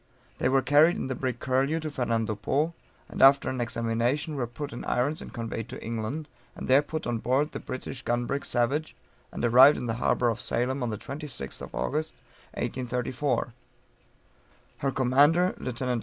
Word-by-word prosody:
They 125 Hz, -, +2 dB
were 135 Hz, 0 st, +3 dB
carried 150 Hz, +5 st, +5 dB
in -, -, -4 dB
the -, -, 0 dB
brig 125 Hz, -1 st, -3 dB
Curlew 135 Hz, +5 st, +1 dB
to 155 Hz, -1 st, -4 dB
Fernando 115 Hz, -5 st, 0 dB
Po, 145 Hz, +10 st, 0 dB, 0.3 s
and -, -, -5 dB
after 135 Hz, +1 st, +6 dB
an 130 Hz, -1 st, -3 dB
examination, 120 Hz, +5 st, -1 dB
were 130 Hz, -4 st, -2 dB
put 140 Hz, +4 st, -7 dB
in 120 Hz, -, -6 dB
irons 145 Hz, +6 st, 0 dB
and -, -, -9 dB
conveyed 115 Hz, -1 st, -5 dB
to -, -, -8 dB
England, 115 Hz, +7 st, -4 dB, 0.3 s
and -, -, -6 dB
there 135 Hz, +2 st, +6 dB
put 155 Hz, +1 st, -5 dB
on 120 Hz, -2 st, -1 dB
board 135 Hz, +6 st, +1 dB
the -, -, -5 dB
British 130 Hz, 0 st, -6 dB
gun 120 Hz, +1 st, -1 dB
brig 140 Hz, +3 st, -2 dB
Savage, 135 Hz, +6 st, 0 dB, 0.4 s
and -, -, -2 dB
arrived 130 Hz, +5 st, +7 dB
in -, -, -4 dB
the 115 Hz, -, -1 dB
harbor 120 Hz, -, +2 dB
of 115 Hz, -, -2 dB
Salem 130 Hz, +3 st, -1 dB
on 120 Hz, -, -1 dB
the 105 Hz, -, -3 dB
26th 140 Hz, -, -6 dB
August, 155 Hz, +2 st, -2 dB, 0.4 s
1834. 125 Hz, 0 st, -2 dB, 1.3 s
Her 135 Hz, -, 0 dB
commander, 145 Hz, +8 st, +4 dB
Lieut. 125 Hz, -2 st, -5 dB
130 Hz, 175 wpm, -27 LUFS, 120-145 Hz, 1.3 s, arrived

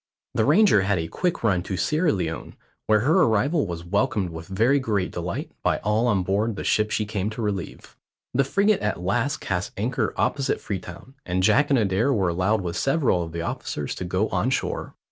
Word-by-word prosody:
The 110 Hz, -, +2 dB
Ranger 180 Hz, -, +5 dB
had 100 Hz, 0 st, +1 dB
a 80 Hz, -1 st, -2 dB
quick 175 Hz, -, -2 dB
run 95 Hz, -6 st, +2 dB
to 95 Hz, +1 st, -4 dB
Sierra 155 Hz, -, +1 dB
Leone, 80 Hz, -5 st, -4 dB, 0.3 s
where 110 Hz, -1 st, +4 dB
her 160 Hz, -, +3 dB
arrival 120 Hz, -, +2 dB
was 85 Hz, -1 st, -6 dB
welcomed 95 Hz, -1 st, 0 dB
with 80 Hz, 0 st, -8 dB
very 115 Hz, +9 st, +2 dB
great 105 Hz, -7 st, -1 dB
delight 85 Hz, 0 st, -4 dB
by -, -, +1 dB
all 105 Hz, +3 st, +2 dB
on 100 Hz, -5 st, +2 dB
board 105 Hz, +4 st, 0 dB
the -, -, -5 dB
ship 110 Hz, 0 st, +2 dB
she 110 Hz, -, -1 dB
came 105 Hz, -1 st, -2 dB
to 110 Hz, +2 st, -6 dB
relieve. 100 Hz, -4 st, -4 dB, 0.4 s
The 135 Hz, -, +3 dB
frigate 200 Hz, +8 st, +2 dB
at 105 Hz, -3 st, -1 dB
last 120 Hz, +10 st, 0 dB
cast 90 Hz, 0 st, -3 dB
anchor 120 Hz, +6 st, -1 dB
opposite 140 Hz, -2 st, 0 dB
Freetown, 95 Hz, +5 st, -7 dB
and 90 Hz, +1 st, -1 dB
Jack 140 Hz, +9 st, +4 dB
and 140 Hz, -, +4 dB
Adair 110 Hz, +4 st, +2 dB
were 100 Hz, -8 st, +1 dB
allowed 95 Hz, +5 st, +1 dB
with 85 Hz, -2 st, -4 dB
several 135 Hz, -, +2 dB
of 85 Hz, -1 st, -5 dB
the 85 Hz, 0 st, -4 dB
officers 75 Hz, -3 st, -4 dB
to -, -, -6 dB
go -, -, 0 dB
on -, -, 0 dB
shore. -, -, -2 dB
105 Hz, 200 wpm, -24 LUFS, 90-130 Hz, 0.4 s, Ranger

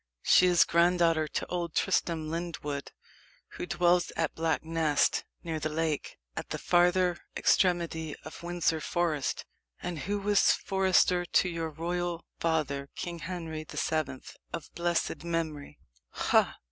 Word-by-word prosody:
"She 185 Hz, -, +6 dB
is 175 Hz, -2 st, +6 dB
granddaughter 170 Hz, -2 st, +3 dB
to -, -, -3 dB
old 170 Hz, -2 st, -3 dB
Tristram 165 Hz, -4 st, 0 dB
Lyndwood, 160 Hz, -4 st, -4 dB, 0.6 s
who -, -, -6 dB
dwells 175 Hz, 0 st, +2 dB
at 165 Hz, -2 st, 0 dB
Black 160 Hz, -1 st, 0 dB
Nest, 160 Hz, -2 st, +1 dB, 0.2 s
near 165 Hz, -2 st, -3 dB
the 155 Hz, -, -2 dB
lake, 155 Hz, -1 st, -2 dB, 0.2 s
at -, -, -5 dB
the -, -, -3 dB
farther 180 Hz, 0 st, +3 dB, 0.2 s
extremity 170 Hz, -4 st, +1 dB
of 155 Hz, -, -9 dB
Windsor 170 Hz, -2 st, 0 dB
Forest, 160 Hz, -4 st, -1 dB, 0.3 s
and 175 Hz, -3 st, -4 dB
who 205 Hz, +5 st, -2 dB
was 205 Hz, 0 st, +4 dB
forester 190 Hz, -2 st, +2 dB
to 180 Hz, +1 st, +2 dB
your 165 Hz, -2 st, -3 dB
royal 170 Hz, +2 st, -3 dB
father, 140 Hz, -4 st, -1 dB
King 170 Hz, -1 st, -5 dB
Henry 165 Hz, -3 st, -5 dB
the -, -, -11 dB
Seventh, 155 Hz, -5 st, -2 dB
of 160 Hz, -, -7 dB
blessed 170 Hz, -1 st, -1 dB
memory." 165 Hz, -4 st, -3 dB, 0.3 s
"Ha! -, -, +2 dB
170 Hz, 135 wpm, -29 LUFS, 160-175 Hz, 0.6 s, She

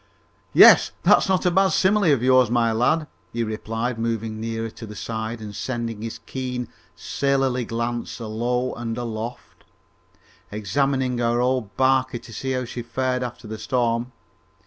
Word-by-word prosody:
"Yes, -, -, +8 dB
that's -, -, +5 dB
not 190 Hz, 0 st, +2 dB
a 180 Hz, -, +4 dB
bad 190 Hz, +2 st, +4 dB
simile 195 Hz, -2 st, +3 dB
of 130 Hz, -4 st, +2 dB
yours, 130 Hz, -2 st, +5 dB
my 120 Hz, -1 st, +2 dB
lad," 125 Hz, +8 st, +2 dB, 0.3 s
he 115 Hz, 0 st, -1 dB
replied, 115 Hz, +2 st, -3 dB
moving 115 Hz, -1 st, -2 dB
nearer 115 Hz, 0 st, -3 dB
to 115 Hz, -, -10 dB
the 105 Hz, -, -9 dB
side 110 Hz, +1 st, -4 dB
and 105 Hz, -1 st, -8 dB
sending 115 Hz, -3 st, -4 dB
his 115 Hz, 0 st, -5 dB
keen 125 Hz, -2 st, -4 dB, 0.3 s
sailorly 135 Hz, -3 st, 0 dB
glance 120 Hz, +2 st, -3 dB
alow 120 Hz, +3 st, -1 dB
and 115 Hz, -1 st, -4 dB
aloft, 115 Hz, 0 st, -6 dB, 0.9 s
examining 130 Hz, +4 st, 0 dB
our 120 Hz, 0 st, +1 dB
old 125 Hz, -4 st, -1 dB
barquey 130 Hz, -1 st, +2 dB
to 115 Hz, -, -11 dB
see 130 Hz, +5 st, -3 dB
how 130 Hz, -1 st, -1 dB
she 120 Hz, +1 st, -6 dB
fared 125 Hz, +1 st, -1 dB
after 120 Hz, -2 st, -6 dB
the 110 Hz, 0 st, -6 dB
storm. 120 Hz, -1 st, 0 dB
120 Hz, 155 wpm, -23 LUFS, 115-130 Hz, 0.9 s, Yes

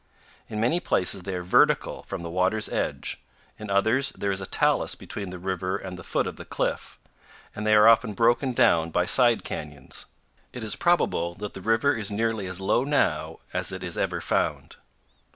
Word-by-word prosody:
In 105 Hz, -, -4 dB
many 125 Hz, +10 st, +2 dB
places 95 Hz, -, +1 dB
they 95 Hz, +1 st, -5 dB
are 90 Hz, -, -4 dB
vertical 90 Hz, -, +2 dB
from 95 Hz, -3 st, -7 dB
the 85 Hz, -, -5 dB
water's 95 Hz, +5 st, +1 dB
edge; -, -, -2 dB, 0.4 s
in 105 Hz, -1 st, -7 dB
others 110 Hz, +7 st, +2 dB
there 100 Hz, -, -1 dB
is 95 Hz, 0 st, -3 dB
a 95 Hz, -, -4 dB
talus -, -, +1 dB
between 100 Hz, -2 st, -7 dB
the 90 Hz, -, -7 dB
river 95 Hz, 0 st, -2 dB
and 95 Hz, -1 st, -7 dB
the 90 Hz, -, -10 dB
foot -, -, -1 dB
of -, -, -6 dB
the -, -, -8 dB
cliff; -, -, -3 dB, 0.6 s
and 105 Hz, 0 st, -4 dB
they 110 Hz, -, +5 dB
are 105 Hz, +1 st, +7 dB
often 115 Hz, -1 st, +5 dB
broken 120 Hz, +5 st, +2 dB
down 85 Hz, -7 st, +3 dB
by 90 Hz, +2 st, +1 dB
side 120 Hz, +2 st, +4 dB
canyons. 75 Hz, -3 st, -7 dB, 0.5 s
It 125 Hz, -, -7 dB
is 110 Hz, -, -2 dB
probable 85 Hz, -, +1 dB
that 105 Hz, +1 st, -6 dB
the 95 Hz, -, -8 dB
river 115 Hz, +7 st, +2 dB
is 105 Hz, -3 st, -2 dB
nearly 110 Hz, -1 st, -1 dB
as 95 Hz, 0 st, -5 dB
low 105 Hz, +5 st, +1 dB
now 145 Hz, +1 st, 0 dB
as -, -, +1 dB
it -, -, -6 dB
is -, -, -4 dB
ever -, -, -1 dB
found. -, -, -1 dB
100 Hz, 195 wpm, -26 LUFS, 90-115 Hz, 0.6 s, are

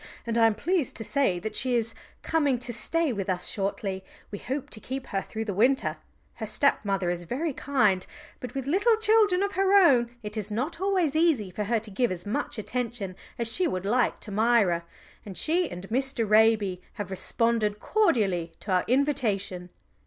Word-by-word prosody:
"And 230 Hz, -1 st, -2 dB
I 230 Hz, -1 st, +6 dB
am 220 Hz, -, +1 dB
pleased 335 Hz, -, -1 dB
to 225 Hz, -, -4 dB
say 265 Hz, -6 st, +1 dB
that 215 Hz, +5 st, -5 dB
she 250 Hz, 0 st, 0 dB
is 230 Hz, -1 st, -1 dB, 0.3 s
coming 290 Hz, -5 st, +1 dB
to 240 Hz, 0 st, -6 dB
stay 300 Hz, +6 st, 0 dB
with 195 Hz, -3 st, -4 dB
us 180 Hz, -1 st, 0 dB
shortly. 195 Hz, -1 st, -2 dB, 0.3 s
We 205 Hz, -, -5 dB
hope 265 Hz, +2 st, -4 dB
to 215 Hz, -, -4 dB
keep 260 Hz, +4 st, -5 dB
her 195 Hz, -, -2 dB
through 220 Hz, +3 st, -5 dB
the 205 Hz, -, -2 dB
winter. 250 Hz, +8 st, +2 dB, 0.4 s
Her 220 Hz, -, -4 dB
stepmother 200 Hz, -7 st, +1 dB
is 175 Hz, 0 st, -4 dB
very 285 Hz, -, -2 dB
kind, 215 Hz, -10 st, +1 dB, 0.3 s
but 250 Hz, -, -8 dB
with 270 Hz, -1 st, -3 dB
little 400 Hz, -, +3 dB
children 430 Hz, -4 st, +3 dB
of 400 Hz, -, -1 dB
her 390 Hz, +1 st, +2 dB
own, 245 Hz, -10 st, +4 dB
it 210 Hz, +1 st, -5 dB
is 210 Hz, -1 st, -3 dB
not 260 Hz, -, -3 dB
always 370 Hz, -7 st, +1 dB
easy 310 Hz, -, +2 dB
for 210 Hz, +3 st, -3 dB
her 230 Hz, +2 st, +1 dB
to 215 Hz, -1 st, -8 dB
give 240 Hz, +3 st, +1 dB
as 175 Hz, -1 st, -5 dB
much 240 Hz, +5 st, -3 dB
attention 215 Hz, -3 st, -3 dB, 0.2 s
as 235 Hz, -, -2 dB
she 345 Hz, +11 st, 0 dB
would 185 Hz, 0 st, -3 dB
like 245 Hz, +5 st, +1 dB
to 210 Hz, -, -8 dB
Myra, 205 Hz, -6 st, +2 dB, 0.4 s
and 195 Hz, -3 st, -9 dB
she 340 Hz, +2 st, +1 dB
and 180 Hz, +2 st, -8 dB
Mr. 260 Hz, -1 st, 0 dB
Raby 210 Hz, -3 st, +3 dB
have 200 Hz, -2 st, -6 dB
responded 215 Hz, +2 st, +1 dB
cordially 205 Hz, -, +1 dB
to 205 Hz, -, -5 dB
our 180 Hz, -1 st, +2 dB
invitation." 225 Hz, -10 st, 0 dB
230 Hz, 190 wpm, -27 LUFS, 200-280 Hz, 0.4 s, I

